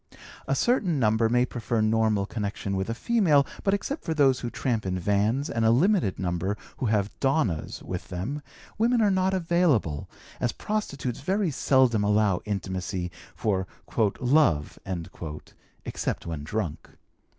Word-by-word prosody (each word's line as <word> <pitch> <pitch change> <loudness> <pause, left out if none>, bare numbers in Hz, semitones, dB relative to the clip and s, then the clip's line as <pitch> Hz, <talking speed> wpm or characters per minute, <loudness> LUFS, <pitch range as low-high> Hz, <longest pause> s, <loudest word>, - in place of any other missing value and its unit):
A 135 - +1
certain 195 - +2
number 110 -1 +3
may 125 +1 +3
prefer 120 -2 -2
normal 110 -2 +2
connection 100 -2 -3
with 95 +2 -2
a 115 - -1
female, 160 - +3 0.2
but 195 0 +3
except 275 +9 -4
for 160 - -2
those 135 -4 +4
who 120 - -3
tramp 115 -3 -1
in 95 -1 -2
vans 105 - +1
and 115 -5 -1
a 110 - +5
limited 155 - +3
number 95 +3 -1 0.2
who 125 - -1
have 105 -2 +1
'donnas' 135 - 0
with 90 -1 -5
them, 100 +12 -4 0.4
women 235 +2 +3
are 205 - +4
not 190 0 +2
available, 165 - +1 0.3
as 120 -2 0
prostitutes 140 - -3
very 190 +4 0
seldom 130 -5 +3
allow 105 -3 +2
intimacy 95 -3 -3 0.2
for 95 -3 0 0.5
'love' 125 - +2 1.1
except - - -3
when 80 -3 -4
drunk. 85 -2 -3
115 Hz, 145 wpm, -27 LUFS, 100-150 Hz, 1.1 s, a